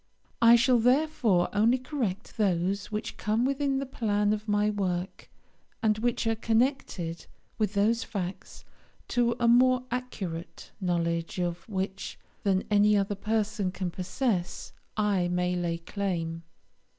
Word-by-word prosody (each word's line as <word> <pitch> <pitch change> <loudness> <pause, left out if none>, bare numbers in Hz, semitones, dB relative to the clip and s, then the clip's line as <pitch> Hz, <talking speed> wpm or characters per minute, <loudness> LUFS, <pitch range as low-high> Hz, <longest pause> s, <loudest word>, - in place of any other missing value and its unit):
I 230 0 +8
shall 245 +1 +4
therefore 245 - +3
only 225 +5 +4
correct 245 -7 -4
those 195 -1 0
which 215 +1 -4
come 220 +3 +1
within 275 0 0
the 275 - -2
plan 210 -5 0
of 215 +1 -4
my 210 0 +2
work, 185 -3 -3 0.5
and 215 -1 +2
which 235 0 0
are 225 - +2
connected 225 - -1 0.3
with 210 -1 0
those 225 +3 +2
facts, 190 -3 -6 0.4
to 235 -1 +2
a 235 - +2
more 255 +1 +5
accurate 195 -9 -5
knowledge 170 +1 -1
of 175 +1 -3
which 190 -1 -4 0.2
than 190 -1 +1
any 210 0 +5
other 200 +1 0
person 210 -1 -1
can 180 -1 -3
possess 185 +1 -2 0.2
I 200 -4 +2
may 180 0 0
lay 170 -1 -1
claim. 165 -2 -3
205 Hz, 135 wpm, -28 LUFS, 180-235 Hz, 0.5 s, I